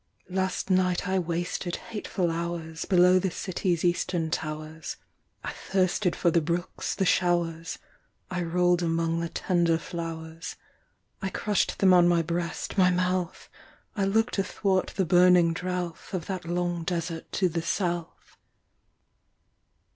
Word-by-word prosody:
Last 190 Hz, +1 st, -1 dB
night 185 Hz, -1 st, +2 dB
I 190 Hz, 0 st, +2 dB
wasted 175 Hz, +1 st, -2 dB
hateful 200 Hz, -5 st, -3 dB
hours 165 Hz, -1 st, -4 dB
Below 180 Hz, 0 st, +5 dB
the 190 Hz, -, 0 dB
city’s 180 Hz, -1 st, -2 dB
eastern 175 Hz, -2 st, 0 dB
towers: 155 Hz, 0 st, -4 dB, 0.5 s
I -, -, -3 dB
thirsted 185 Hz, -1 st, 0 dB
for 170 Hz, -, +2 dB
the 170 Hz, -, +3 dB
brooks, 170 Hz, +3 st, -2 dB
the 195 Hz, -, +1 dB
showers: 170 Hz, -2 st, +1 dB, 0.5 s
I 180 Hz, -1 st, -1 dB
roll’d 175 Hz, +1 st, +2 dB
among 165 Hz, 0 st, 0 dB
the 170 Hz, 0 st, -2 dB
tender 170 Hz, -3 st, +1 dB
flowers: 165 Hz, 0 st, -6 dB, 0.7 s
I 190 Hz, -, -1 dB
crush’d 205 Hz, +1 st, 0 dB
them 190 Hz, -2 st, +5 dB
on 175 Hz, -1 st, +6 dB
my 170 Hz, -1 st, +3 dB
breast, 170 Hz, +4 st, -3 dB
my 180 Hz, -1 st, +6 dB
mouth: 180 Hz, 0 st, -1 dB, 0.5 s
I 200 Hz, -3 st, +1 dB
look’d 220 Hz, +2 st, +1 dB
athwart 195 Hz, -1 st, +1 dB
the 190 Hz, -, +1 dB
burning 175 Hz, -1 st, +5 dB
drouth 180 Hz, +1 st, -4 dB
Of 170 Hz, -3 st, -3 dB
that 185 Hz, -2 st, -4 dB
long 175 Hz, 0 st, -1 dB
desert 170 Hz, -1 st, -3 dB
to 190 Hz, -, +2 dB
the 165 Hz, -1 st, -2 dB
south. 175 Hz, -1 st, -3 dB
175 Hz, 135 wpm, -27 LUFS, 165-185 Hz, 0.7 s, on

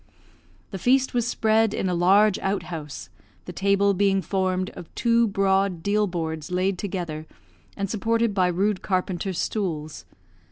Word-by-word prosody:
The 195 Hz, -, -5 dB
feast 260 Hz, +5 st, +2 dB
was 240 Hz, -1 st, 0 dB
spread 220 Hz, -2 st, +2 dB
in -, -, -1 dB
a 180 Hz, -, 0 dB
large 195 Hz, +4 st, +4 dB
outhouse, 170 Hz, -7 st, -4 dB, 0.3 s
the -, -, -7 dB
table 200 Hz, +1 st, +2 dB
being 195 Hz, 0 st, +2 dB
formed 185 Hz, -1 st, -1 dB
of 165 Hz, -, -11 dB
two 235 Hz, -1 st, +3 dB
broad 195 Hz, -3 st, +1 dB
deal 210 Hz, +1 st, +2 dB
boards 160 Hz, -3 st, -4 dB
laid 185 Hz, +1 st, 0 dB
together, 170 Hz, -6 st, -4 dB, 0.5 s
and 200 Hz, -, -1 dB
supported 225 Hz, +2 st, 0 dB
by 185 Hz, -2 st, +2 dB
rude 190 Hz, +3 st, 0 dB
carpenter's 185 Hz, -1 st, -2 dB
stools. 160 Hz, -9 st, -3 dB
195 Hz, 145 wpm, -24 LUFS, 180-210 Hz, 0.5 s, large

